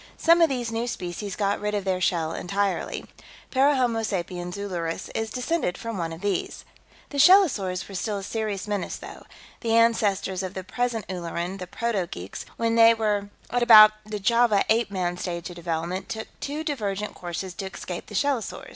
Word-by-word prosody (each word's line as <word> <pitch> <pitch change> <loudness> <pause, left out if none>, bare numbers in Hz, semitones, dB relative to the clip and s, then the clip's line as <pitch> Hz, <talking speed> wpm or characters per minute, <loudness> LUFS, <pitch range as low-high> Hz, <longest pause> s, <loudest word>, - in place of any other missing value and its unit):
Some 335 +1 +5
of 330 - +6
these 245 -4 -2
new 230 +1 -2
species 185 -1 -4
got 200 -1 0
rid 210 0 -1
of 200 -2 -2
their 185 -1 0
shell 165 -3 +1
entirely. 200 +2 -2 0.5
Parahomo 260 -4 +3
sapiens 180 -3 -3
Ulleris 175 -5 -4
is 225 0 -2
descended 250 - -1
from 230 -1 -5
one 165 -3 -3
of 165 +2 -8
these. 200 -3 -2 0.4
"The 285 - -4
shellosaurs 270 - +5
were 200 - -10
still 205 +3 -2
a 195 - -6
serious 210 -2 -3
menace, 205 -3 -2
though. - - -11 0.3
The 230 -1 0
ancestors 210 -5 +2
of 185 0 -5
the 190 - -4
present 230 +3 -2
Ulleran, 180 +1 -4
the 180 - -6
proto 210 -2 -1
geeks, 90 +2 -7
when 230 0 +1
they 230 0 +7
were 210 -2 0 0.2
at 245 +1 +1
about 215 -3 +10
the 215 0 -5
Java 230 0 +3
Ape 225 0 +3
Man 180 -3 -2
stage 175 -1 -4
of - - -10
development, 170 +2 -3
took 220 0 -5
two 295 +2 -4
divergent 210 -9 -3
courses 175 +1 -5
to 195 - -5
escape 180 -2 -7
the 210 - -9
shellosaurs. 275 0 -1
205 Hz, 180 wpm, -25 LUFS, 185-230 Hz, 0.5 s, about